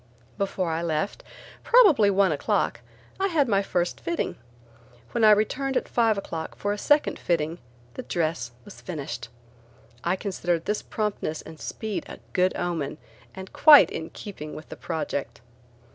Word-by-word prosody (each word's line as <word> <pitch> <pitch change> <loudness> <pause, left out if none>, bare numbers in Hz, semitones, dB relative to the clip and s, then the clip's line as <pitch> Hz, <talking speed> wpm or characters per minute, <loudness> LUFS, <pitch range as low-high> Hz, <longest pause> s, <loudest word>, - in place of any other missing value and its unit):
Before 190 -3 -1
I 160 +1 -1
left, 170 +4 -2 0.4
probably 370 - +6
one 195 -2 +3
o'clock, 145 - 0 0.4
I 390 - +2
had 310 -7 +2
my 200 -3 +3
first 175 -3 -1
fitting. 340 -1 -2 0.8
When 230 - 0
I 215 - +8
returned 255 +6 +2
at - - -2
five 225 -3 +2
o'clock 165 -5 -5
for 205 0 -1
a - - -4
second 295 +5 +2
fitting, 165 -1 -1 0.3
the - - -6
dress 155 -2 -2 0.2
was 205 - -12
finished. 140 -8 -6 0.7
I 175 +2 +1
considered 175 -4 -2
this 210 +1 -1
promptness 210 -7 -3
and 160 - -11
speed 220 -3 -4
a - - -8 0.2
good 185 0 +2
omen 170 -5 -2 0.4
and 190 0 -9
quite 300 -2 +8
in 160 0 -5
keeping 155 -7 -8
with 155 - -10
the - - -7
project. 140 -7 -4
185 Hz, 155 wpm, -26 LUFS, 160-215 Hz, 0.8 s, I